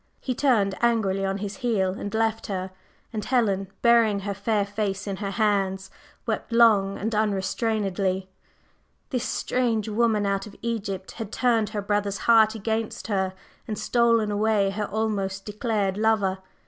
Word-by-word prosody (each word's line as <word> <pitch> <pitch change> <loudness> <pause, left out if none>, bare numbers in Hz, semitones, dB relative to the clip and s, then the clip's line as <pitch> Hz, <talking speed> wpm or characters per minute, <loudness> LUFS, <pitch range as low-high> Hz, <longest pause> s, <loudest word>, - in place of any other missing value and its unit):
He 255 - -2
turned 230 -8 +2
angrily 220 -5 +2
on 195 0 -1
his 200 0 -5
heel 220 -8 +1
and 205 +1 -5
left 225 0 0
her, 190 -2 -3 0.4
and 215 -1 -3
Helen, 205 -7 +1 0.2
burying 230 -4 +4
her 200 +1 -3
fair 205 +1 0
face 205 -1 -3
in 195 -2 -3
her 200 -1 -3
hands, 195 -2 0 0.3
wept - - -3
long 215 -4 +4
and 220 +3 -3
unrestrainedly. 195 -2 0 0.8
This 250 -4 -1
"strange 230 -1 0
woman 215 -1 +1
out 195 +1 -1
of 205 - -13
Egypt" 200 -5 -3
had 220 -3 -7
turned 230 -4 +2
her 210 -2 -4
brother's 205 -1 0
heart 220 -1 +5
against 220 +1 -3
her, 190 -2 0 0.3
and 215 - -3
stolen 230 -2 +2
away 205 -1 +2
her 210 +2 -2
almost 200 -3 -2
declared 210 -2 -1
lover. 210 -3 +2
210 Hz, 150 wpm, -25 LUFS, 195-225 Hz, 0.8 s, heart